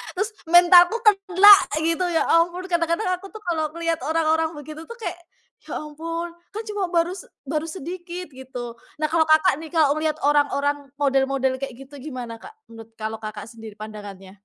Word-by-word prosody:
Terus, 405 +4 -1 0.2
"mentalku 350 +3 +7
kena," 395 -1 +7 0.3
gitu, 330 +2 +1
ya - - +3
ampun! 345 +2 +2
Kadang-kadang 335 +3 0
aku 390 - -10
tuh 435 - -8
kalau 320 -3 -1
ngeliat 335 -1 -1
orang-orang 320 0 +1
begitu 310 +2 -9
tuh 470 - -9
kayak, 355 -7 -6 0.5
"Ya - - -5
ampun, 330 +3 -5 0.2
kan 440 - -4
cuma 410 -3 -2
baru 345 0 +1
se - - -11 0.2
baru 305 +3 -3
sedikit," 350 0 -7
gitu. 250 -2 -8 0.2
Nah, 305 - +1
kalau 320 -1 +3
Kakak 315 +1 +4
nih, 320 - -8
kalau 300 -2 +4
ngelihat 310 0 -1
orang-orang 285 -1 +1
model-model 270 -2 +1
kayak 270 -3 -5
gitu 270 +2 -12
gimana 250 -5 -7
Kak, 430 +1 -13 0.2
menurut 225 0 -12
kalau 220 0 -4
Kakak 215 0 -7
sendiri 225 -2 -11
pandangannya? 205 -3 -10
315 Hz, 170 wpm, -23 LUFS, 270-350 Hz, 0.5 s, mentalku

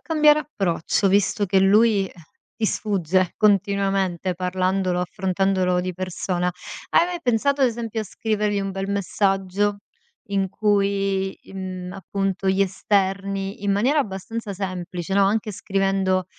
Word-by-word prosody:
cambiare 305 -2 +4
approccio 195 - 0
visto 200 +1 +2
che 195 +1 +3
lui, 200 +1 +4
eh, - - -13 0.4
ti 225 - -2
sfugge 185 -4 0
continuamente 195 -3 +1
parlandolo, 185 0 0
affrontandolo 185 0 0
di 185 0 -3
persona? 185 0 -2 0.4
Hai 340 - +4
mai 355 -1 -4
pensato 275 +1 +1
ad 260 - +6
esempio 230 -2 -3
a 215 - -4
scrivergli 210 0 -1
un 195 0 -3
bel 195 +1 -4
messaggio 200 0 0 0.5
in 195 -1 0
cui 195 -2 0
i - - -15
mhmm, 185 -1 -6
appunto 195 0 -2
gli 190 +1 +3
esterni 195 +1 -1
in 200 - 0
maniera 250 +10 +2
abbastanza 210 -2 -3
semplice, 185 -1 -5
no, 200 - +4
anche 215 +1 0
scrivendo: 195 -1 0
195 Hz, 135 wpm, -23 LUFS, 185-205 Hz, 0.5 s, ad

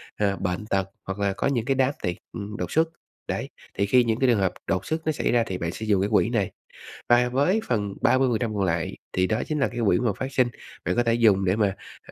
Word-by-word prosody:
à, 100 -2 +1
bệnh 90 +3 -2
tật, 95 -2 -1 0.2
hoặc 95 +1 -5
là 100 -1 +1
có - - -1
những 125 -5 0
cái 135 - +1
đám 130 0 +3
tiệc, 90 - -1 0.2
ừm, 105 0 -6
đột - - -4
xuất. 160 +1 +3 0.4
Đấy, - - -3 0.3
thì 100 - +2
khi 125 +5 +4
những 115 -1 0
cái 130 - +3
trường 115 -4 +3
hợp 95 -2 +1
đột 95 - 0
xuất 160 -1 -3
nó 155 - +2
xảy 150 - -1
ra 120 -1 +3
thì 95 - -3
bạn 85 -2 -2
sẽ 110 - -6
dùng 100 -3 +3
cái 100 - 0
quỹ 110 - +4
này. 105 -6 0 0.6
Và 120 0 +5
với 145 - +2
phần 105 -5 -1
30% 120 -4 +2
còn 100 - 0
lại, 85 -3 -1 0.2
thì 95 0 +2
đó 110 +3 0
chính 155 -1 -1
là 135 - +3
cái 120 +2 -6
quỹ 90 -3 +4
mà 120 -3 +1
phát 135 +1 -4
sinh, 130 -1 +3 0.4
bạn 90 - 0
có 120 - +3
thể 115 - +2
dùng 105 -5 +4
để 95 +2 +2
mà, 100 -3 +1 0.3
ờ, - - -12
110 Hz, 270 wpm, -25 LUFS, 95-125 Hz, 0.6 s, Và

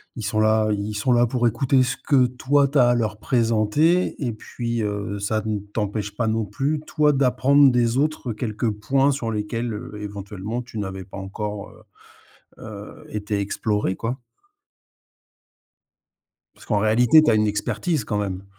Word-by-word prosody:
ils 115 - -6
sont 110 +1 -1
là 110 0 +3
ils 105 +1 -2
sont 105 +5 0
là 120 0 +5
pour 120 +1 -1
écouter 130 +3 +2
ce 125 +1 -2
que 130 -4 +3
toi, 140 +3 +2
tu 150 - 0
as 120 -2 +5
à 120 - +3
leur 110 -3 -1
présenter 120 +10 +2
et 120 - -1
puis, 115 +1 -4
heu, 100 0 -3
ça 110 +2 -1
ne 105 -1 -1
t'empêche 105 0 -4
pas 115 +1 -1
non 110 0 0
plus, 140 +9 -1
toi, 150 -1 +3
d'apprendre 135 +1 +4
des 120 0 +2
autres 150 -3 -1
quelques 110 0 -2
points 135 +7 +1
sur 125 -5 -3
lesquels, 115 +2 -3
heu, 105 - -7
éventuellement, 105 +2 -5
tu 120 -2 -10
n'avais 95 -2 -4
pas 95 - -11
encore, 100 +1 -5
heu - - -18 0.8
heu, 105 -2 -10
été 105 -1 -3
exploré, 105 -1 -1
quoi 120 +6 -4 2.4
parce - - -17
qu'en 105 - +1
réalité, 120 +8 +5
tu 150 - +3
as - - +4
une 105 0 +3
expertise 130 - -1
quand 105 - -2
même. 95 -2 -3
110 Hz, 170 wpm, -23 LUFS, 105-125 Hz, 2.4 s, là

